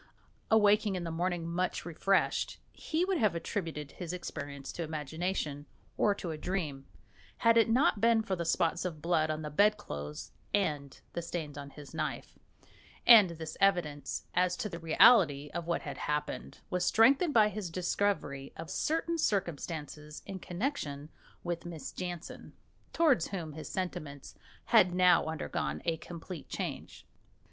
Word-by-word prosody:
Awaking 210 -2 +4
in 180 - -3
the 165 - -4
morning 175 0 -1
much 175 +2 -2
refreshed, 185 +3 +1 0.2
he 325 +3 -1
would 375 -3 0
have 210 -7 +2
attributed 165 -4 -4
his 175 -1 -6
experience 140 -6 -6
to - - -6
imagination 155 -1 -3 0.3
or 205 - +3
to 175 -4 -5
a 155 - -6
dream, 155 -7 -3 0.5
had 230 0 +4
it 230 -1 +5
not 245 -2 +3
been 230 -1 +4
for 195 -4 -1
the 170 - -3
spots 165 0 +1
of 170 -4 -4
blood 155 -1 +1
on 155 0 -2
the 150 - -5
bedclothes 145 - 0 0.2
and 150 -8 -1
the 170 - -2
stains 160 -4 -5
on 140 -1 -7
his 145 0 -12
knife, - - -4 0.7
and 220 -6 +9
this 160 -1 -6
evidence, 160 -8 +1
as 180 0 +2
to 210 - -3
the 170 - -6
reality 160 - +5
of 170 0 -4
what 170 - 0
had 140 -3 -6
happened, 150 0 -3
was 180 0 0
strengthened 275 - +4
by 215 -2 +7
his 210 -4 -5
discovery 175 -6 -1
of 165 +2 -7
certain 325 - 0
circumstances 155 - -3
in 190 -1 -6
connexion 175 - -3 0.3
with 175 -1 -3
Miss 170 -4 -7
Jansen, 175 -2 -7 0.4
towards 290 - +3
whom 170 -6 -5
his 155 +1 -7
sentiments 155 -7 -5 0.3
had 180 0 +5
now 180 -2 +5
undergone 160 0 -3
a 165 -1 +1
complete 170 -1 -9
change. - - -5
175 Hz, 155 wpm, -31 LUFS, 155-200 Hz, 0.7 s, and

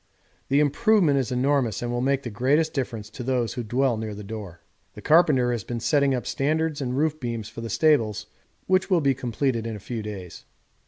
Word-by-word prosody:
The 140 +1 +3
improvement 155 0 +3
is 130 -1 -2
enormous 125 -3 +1
and 120 - -2
will 120 0 -1
make 135 +1 +1
the 120 - -5
greatest 140 +9 +1
difference 115 -6 -3
to 125 - -8
those 125 -2 -1
who 125 - -4
dwell 120 +2 0
near 110 -1 -5
the 105 - -8
door. 100 -5 -8 0.3
The - - -9
carpenter 150 -7 +4
has 120 -4 -2
been 120 +3 -4
setting 140 +2 +2
up 125 - -4
standards 155 +1 -1
and 130 -1 -2
roof 155 +1 0
beams 115 -5 -4
for 115 - -8
the 115 - -5
stables, 120 -10 +2 0.4
which 185 +1 +2
will 180 -4 +3
be 140 -2 +3
completed 120 -2 -2
in 115 - -4
a - - -7
few 115 +3 -5
days. 100 -5 -8
125 Hz, 210 wpm, -25 LUFS, 115-145 Hz, 0.4 s, carpenter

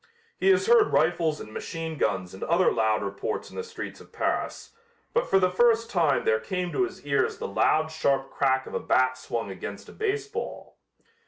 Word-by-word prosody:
He 385 - +3
has 385 0 +4
heard 460 -2 +5
rifles 160 -1 +2
and 110 - -9
machine 165 +3 -5
guns 95 -3 -1
and 95 - -11
other 170 +3 +3
loud 110 -1 +1
reports 100 0 -4
in - - -13
the 460 - -3
streets 460 - -8
of - - -17
Paris, - - -2 0.4
but 485 +1 +1
for - - +5
the 185 -1 +3
first 230 +3 +3
time 165 -6 +2
there 110 0 +3
came 180 +10 -3
to 380 - +1
his 370 - -10
ears 450 -1 +1
the 470 - -4
loud 155 - +2
sharp 140 -4 0
crack 130 -1 +1
of - - -10
a - - 0
bat 130 0 +2
swung 115 -5 -4
against 100 +2 -7
a - - -12
baseball. 430 +1 -4
160 Hz, 195 wpm, -26 LUFS, -, 0.4 s, heard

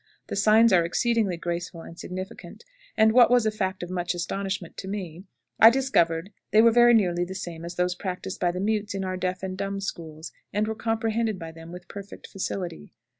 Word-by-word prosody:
The - - -3
signs 215 +2 +5
are 175 -2 +5
exceedingly 210 +1 +1
graceful 170 0 -4
and 165 - -11
significant; 185 - -8 0.3
and, 220 0 +6
what 240 -1 +6
was 245 -2 +4
a 215 - +2
fact 190 -3 -3
of 175 - -6
much 180 -1 -2
astonishment 190 0 -3
to 190 - -6
me, 185 -3 -6 0.3
I 225 - +10
discovered 195 -9 +1 0.2
they 215 - +4
were 230 - +7
very 240 +1 +6
nearly 175 -5 +2
the 185 +2 -6
same 170 -3 -6
as 170 +1 -6
those 180 0 +1
practiced 185 +1 -5
by 175 - +2
the 180 +1 -3
mutes 210 0 -1
in 190 -1 -2
our 185 0 -2
deaf 185 0 -3
and 185 -1 -3
dumb 195 +1 -3
schools, 160 -4 -6 0.2
and 210 +1 0
were 220 - -1
comprehended 225 -1 -1
by 165 -2 -7
them 165 +1 -12
with 180 0 -10
perfect 200 0 -10
facility. 180 - -5
190 Hz, 205 wpm, -26 LUFS, 175-215 Hz, 0.3 s, I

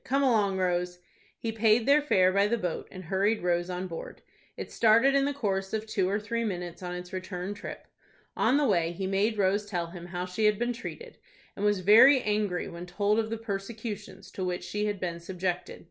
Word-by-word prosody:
Come 275 +2 +1
along, 210 -7 +2
Rose." 180 -1 0 0.4
He 225 - -3
paid 220 +1 +3
their 285 +2 +5
fare 185 -10 +3
by 200 +1 +3
the 235 +3 +1
boat, 180 -6 -3
and 185 -1 -9
hurried 195 +4 0
Rose 175 0 0
on 180 +1 -3
board. 170 -3 -8 0.3
It - - -6
started 230 +4 +4
in 275 0 +3
the 285 - 0
course 195 -8 -2
of 220 0 -2
two 190 -4 0
or 205 +2 0
three 230 +2 -2
minutes 180 -5 -4
on 180 -1 -4
its 180 +1 -8
return 185 +1 -4
trip. 205 - -8 0.5
On 270 - +3
the 295 - +2
way 170 -7 +1
he 190 +2 -4
made 200 +3 +1
Rose 200 +1 +1
tell 175 -4 -3
him 175 -1 -9
how 180 0 -4
she 185 +4 -1
had 210 -1 +4
been 240 +2 -1
treated, 465 - -9 0.4
and 200 - -5
was 205 -2 +2
very 230 +8 +8
angry 210 -5 -1
when 170 +1 -8
told 205 +4 +1
of 220 -1 -1
the 225 - -3
persecutions 205 -2 -6
to 190 - -5
which 180 -1 -2
she 210 0 -2
had 205 -2 -2
been 170 -2 -3
subjected. 180 0 -4
200 Hz, 215 wpm, -28 LUFS, 180-220 Hz, 0.5 s, very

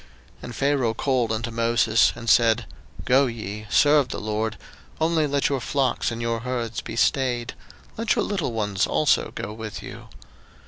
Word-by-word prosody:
02:010:024 - - -26
And 120 - -7
Pharaoh 135 -5 +1
called 125 -3 0
unto 115 +1 -2
Moses, 115 -1 +3
and 115 -1 -9
said, 115 -1 +4 0.4
Go 135 +2 +4
ye, 110 -2 -6
serve 145 +6 +4
the - - -4
LORD; 110 +1 -2 0.4
only 160 -1 +2
let 140 0 +1
your 135 -3 -1
flocks 135 +1 0
and 115 -1 -5
your 115 -1 -1
herds 120 -1 -3
be 115 - -7
stayed: 120 0 +1 0.4
let 225 0 +1
your - - 0
little 185 -11 -2
ones 105 -4 0
also - - +2
go 105 - -5
with 110 -1 -7
you. - - -10
120 Hz, 170 wpm, -24 LUFS, 110-135 Hz, 0.4 s, said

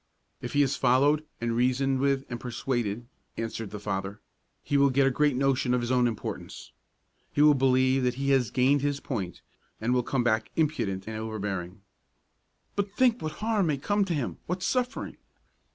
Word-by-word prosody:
"If 120 - -5
he 145 0 +4
is 135 0 0
followed 145 +5 +3 0.2
and 115 0 -1
reasoned 130 +2 +1
with 135 0 +1
and 120 -1 -5
persuaded," 120 -2 -2 0.3
answered 115 -2 -4
the 105 - -6
father, 100 0 -4 0.4
"he 145 - -2
will 140 0 +5
get 135 +1 +3
a 135 - +3
great 145 +1 +2
notion 135 -1 +2
of 125 - 0
his 120 +1 -2
own 125 -1 +3
importance. 115 -3 -6 0.6
He 145 - +3
will 150 0 +7
believe 130 0 +3
that 125 -1 0
he 140 +1 0
has 130 -5 +3
gained 135 +4 +3
his 145 0 -1
point, 100 - -5 0.4
and 115 +3 0
will 125 - +3
come 125 +1 -1
back 110 -2 +1
impudent 110 -12 0
and 110 0 -4
overbearing." 100 -4 -4 0.9
"But 200 0 -1
think 250 -2 +3
what 155 0 -3
harm 215 -5 +2
may 150 -3 +1
come 205 +9 +1
to 175 -3 -1
him, 140 -5 -3
what 180 +1 -3
suffering!" 250 +5 -1
130 Hz, 185 wpm, -28 LUFS, 115-145 Hz, 0.9 s, will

